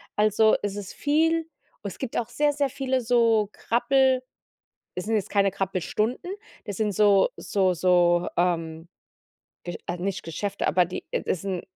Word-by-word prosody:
Also, 215 +1 +4
es 205 -1 -2
ist 200 -2 -7
viel 325 +2 +1 0.3
es 200 -3 -6
gibt 260 -4 -4
auch 235 -1 -2
sehr, 290 +4 +1
sehr 280 -1 0
viele 265 -1 -1
so 230 -3 +3
Krabbel 260 +2 +2 0.7
es 180 - -3
sind 225 +1 0
jetzt 205 -3 -1
keine 200 -1 +2
Krabbelstunden, 205 - -2 0.3
das 205 - -5
sind 210 -2 0
so 200 -1 +4
so 190 -2 +1
so, 175 0 +3
ähm, 165 -2 -1 0.8
Ge 175 - -5
äh, 175 - -2
nicht 185 +1 -3
Geschäfte, 180 +5 -3
aber 180 - +4
die 175 - -7
äh, - - -1
das 190 - -2
'n 185 -3 -2
205 Hz, 165 wpm, -25 LUFS, 180-245 Hz, 0.8 s, Also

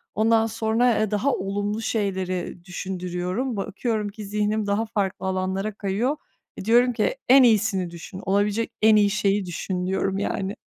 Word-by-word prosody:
Ondan 225 +1 +3
sonra 225 +1 +1
e, 215 -1 0
daha 230 +7 +1
olumlu, 205 +1 -2
ııı, 225 - -3
şeyleri 185 -5 -2
düşündürüyorum. 185 +6 -3
Bakıyorum 210 +1 -2
ki 210 0 -9
zihnim 210 +1 -1
daha 205 +3 +1
farklı 195 -3 -2
alanlara 190 +2 -1
kayıyor. 210 +9 -1 0.4
E, 190 - -7
diyorum 245 +2 +4
ki 220 +3 0
“En 265 0 +8
iyisini 210 -6 +2
düşün, 175 +3 -9
olabilecek 205 +3 +1
en 220 0 +6
iyi 205 -1 +5
şeyi 200 -1 +1
düşün.“ 180 +1 -3
diyorum 190 +1 -1
yani. 200 0 -2
205 Hz, 160 wpm, -24 LUFS, 190-220 Hz, 0.4 s, En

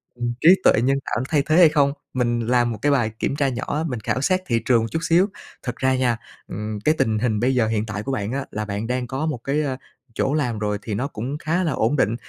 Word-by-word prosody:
ừm, 120 0 -2
trí 160 - +7
tuệ - - +6
nhân 135 +2 +2
tạo 120 - -1
thay 145 -3 +2
thế 155 - +2
hay 175 -3 +8
không? 140 -2 +2 0.2
Mình 120 -2 0
làm 120 -1 +2
1 110 - -4
cái 145 - +2
bài 120 -6 +2
kiểm - - -1
tra 140 -2 +1
nhỏ 125 0 -4
á, 155 - -1
mình 125 -5 -3
khảo 120 +4 -2
sát 185 +6 +2
thị 115 -1 +2
trường 120 -3 +4
một 115 - -2
chút 160 - -1
xíu, 170 +4 +4 0.4
thật 125 -2 -4
ra 130 0 +2
nha, 125 -3 +1 0.3
ừm, 105 +1 -5
cái 155 - +4
tình 110 -1 +1
hình 110 -2 0
bây 130 +3 +1
giờ 120 -3 +2
hiện 110 -1 -1
tại 105 -1 -5
của 135 - -3
bạn 105 -5 -2
á 135 +1 -2
là 105 0 -3
bạn 105 +2 -4
đang 125 0 -2
có 135 +5 -3
một 150 -6 -2
cái, 145 +2 0
ơ, 135 -3 -2 0.4
chỗ 135 - 0
làm 125 -8 -1
rồi 105 -1 -1
thì 105 - -5
nó 125 +7 -1
cũng 135 +2 -5
khá 170 +3 -1
là 165 - 0
ổn 120 +2 +1
định. 115 -5 +2
125 Hz, 280 wpm, -22 LUFS, 110-140 Hz, 0.4 s, hay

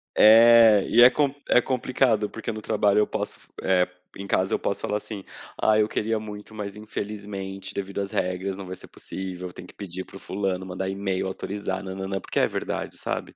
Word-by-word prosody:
É, 115 -1 +8
e 120 - +5
é 125 - +10
com 140 +1 +1 0.2
é 125 - +6
complicado, 125 -4 +1
porque 115 +1 -5
no 110 0 -6
trabalho 105 -1 +2
eu 105 - +3
posso - - -4
f - - -22 0.2
eh, 90 -1 +3
fazer 90 0 -25 0.2
em 100 - -5
casa 95 -1 +1
eu - - +3
posso 100 - -2
falar 105 - -1
assim, 105 -2 -7 0.4
ah, 110 0 +4
eu 105 0 +3
queria 110 +1 -1
muito 105 0 -9
mas 100 -1 -5
infelizmente 100 -2 -6
devido 100 0 -4
às 100 - -3
regras 90 +1 -2
não 95 - -7
vai 90 0 -6
ser - - -10
possível, 90 -1 -7
tem 90 - -10
que - - -15
pedir 95 -2 -6
para - - -15
o - - -13
fulano, 95 -1 -2
mandar 95 +1 -4
e-mail, 95 -1 -2
autorizar, 95 0 -4
nã-nã-nã, 95 0 -4
porque - - -2
é - - +4
verdade - - -4
sabe. - - -4
100 Hz, 210 wpm, -25 LUFS, 95-110 Hz, 0.4 s, é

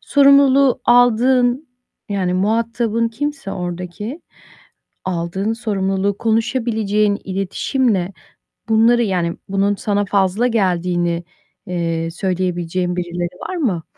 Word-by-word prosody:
Sorumluluğu 275 -2 +5
aldığın 245 +3 +3 0.4
yani 185 -3 -1
muhatabın 230 +3 0
kimse 275 -2 -4
oradaki 180 - -5 0.9
aldığın 185 +4 -2
sorumluluğu 200 -3 -1
konuşabileceğin 220 -3 0
iletişimle 195 +1 -1 0.6
bunları 235 +2 +4
yani 175 -4 -1
bunun 195 +1 +1
sana 205 0 -1
fazla 195 +4 +1
geldiğini, 175 -5 0 0.4
eee, 165 -2 -2
söyleyebileceğin 180 -1 -2
birileri 175 0 -4
var 370 - -3
mı? 205 - -1
200 Hz, 90 wpm, -19 LUFS, 180-235 Hz, 0.9 s, Sorumluluğu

